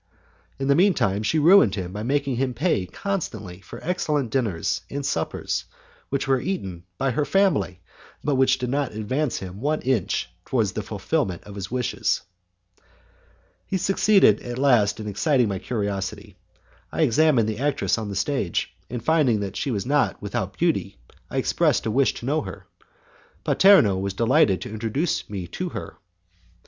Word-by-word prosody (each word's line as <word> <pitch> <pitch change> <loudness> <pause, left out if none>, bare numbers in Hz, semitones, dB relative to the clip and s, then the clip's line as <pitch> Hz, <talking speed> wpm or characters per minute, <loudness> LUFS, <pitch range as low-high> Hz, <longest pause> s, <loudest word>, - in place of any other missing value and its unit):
In 135 +1 -2
the 140 - +5
mean 185 +5 +4
time, 100 +1 +1
she 110 +9 +1
ruined 155 - +6
him 90 -2 -5
by 105 - -4
making 135 +1 0
him 130 -1 -1
pay 115 - 0
constantly 110 - -4
for 90 - -10
excellent 150 -7 -1
dinners 110 -11 -1
and 140 0 -4
suppers, 80 -11 -2 0.4
which 140 0 -1
were 135 -2 +2
eaten 95 - -4
by 135 -1 0
her 150 +5 0
family, 160 - +1 0.4
but 150 - +1
which 130 0 +3
did 125 -1 -3
not 140 -3 -1
advance 130 +6 -1
him 95 +2 -7
one 150 +3 0
inch 110 -8 0
towards 110 -4 0
the - - -3
fulfilment 90 -3 -2
of 105 - -11
his 95 -2 -6
wishes. 125 0 -1 1.5
He 190 - 0
succeeded 195 - +4
at 120 0 -6
last 120 -8 +3
in 110 - -6
exciting 120 +5 +2
my 100 -2 -2
curiosity. 100 -4 -4 0.6
I - - +1
examined 135 -3 +3
the 110 0 -3
actress 140 -4 0
on 110 -2 -4
the 100 - -5
stage, 105 -3 -1 0.2
and 120 -1 -5
finding 150 -9 +3
that 100 -1 -4
she - - -2
was 105 -6 -2
not 135 -5 +1
without - - -4
beauty - - 0 0.3
I - - -4
expressed - - +1
a 110 - 0
wish 135 +3 +2
to - - -7
know 150 +4 +1
her. 95 -2 -9 0.8
Paterno 150 - +5
was 100 0 -3
delighted 115 -5 +3
to - - -6
introduce 115 +9 -2
me 95 -4 -4
to 180 - -4
her. - - -7
125 Hz, 170 wpm, -24 LUFS, 100-145 Hz, 1.5 s, ruined